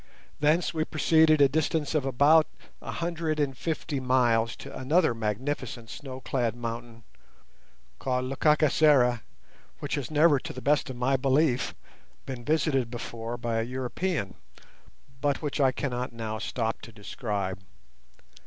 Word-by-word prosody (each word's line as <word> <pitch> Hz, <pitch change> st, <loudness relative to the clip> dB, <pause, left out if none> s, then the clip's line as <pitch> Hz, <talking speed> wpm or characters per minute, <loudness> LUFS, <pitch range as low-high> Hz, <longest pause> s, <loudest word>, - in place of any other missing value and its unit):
Thence 155 Hz, +5 st, +2 dB
we 160 Hz, -1 st, 0 dB
proceeded 155 Hz, -1 st, +4 dB
a 140 Hz, -, +8 dB
distance 155 Hz, +2 st, 0 dB
of 150 Hz, -4 st, +1 dB
about 145 Hz, +5 st, +5 dB, 0.3 s
a -, -, -8 dB
hundred 165 Hz, -2 st, -2 dB
and 140 Hz, -2 st, 0 dB
fifty 150 Hz, 0 st, -3 dB
miles 120 Hz, -3 st, +2 dB
to -, -, -10 dB
another 155 Hz, +3 st, +2 dB
magnificent 115 Hz, +1 st, -3 dB
snow 130 Hz, -2 st, -8 dB
clad 120 Hz, -4 st, -1 dB
mountain 115 Hz, -1 st, -6 dB, 1.0 s
called 130 Hz, -1 st, -1 dB
Lekakisera, 140 Hz, -3 st, +3 dB, 0.6 s
which -, -, -5 dB
has 140 Hz, -4 st, -2 dB
never, 155 Hz, -1 st, +4 dB
to -, -, -7 dB
the 130 Hz, -, -7 dB
best 145 Hz, +2 st, +1 dB
of 130 Hz, -, -5 dB
my 130 Hz, +2 st, +1 dB
belief, 135 Hz, 0 st, +1 dB, 0.5 s
been 130 Hz, -3 st, -6 dB
visited 140 Hz, -3 st, +1 dB
before 115 Hz, 0 st, -5 dB
by 115 Hz, -1 st, -2 dB
a -, -, 0 dB
European, 130 Hz, -, -3 dB, 0.9 s
but 145 Hz, +1 st, 0 dB
which 145 Hz, 0 st, -1 dB
I 135 Hz, -1 st, +5 dB
cannot 125 Hz, -2 st, -3 dB
now 110 Hz, -1 st, -4 dB
stop 115 Hz, -1 st, -2 dB
to 115 Hz, -, -10 dB
describe. 100 Hz, -3 st, -4 dB
130 Hz, 140 wpm, -27 LUFS, 120-150 Hz, 1.0 s, a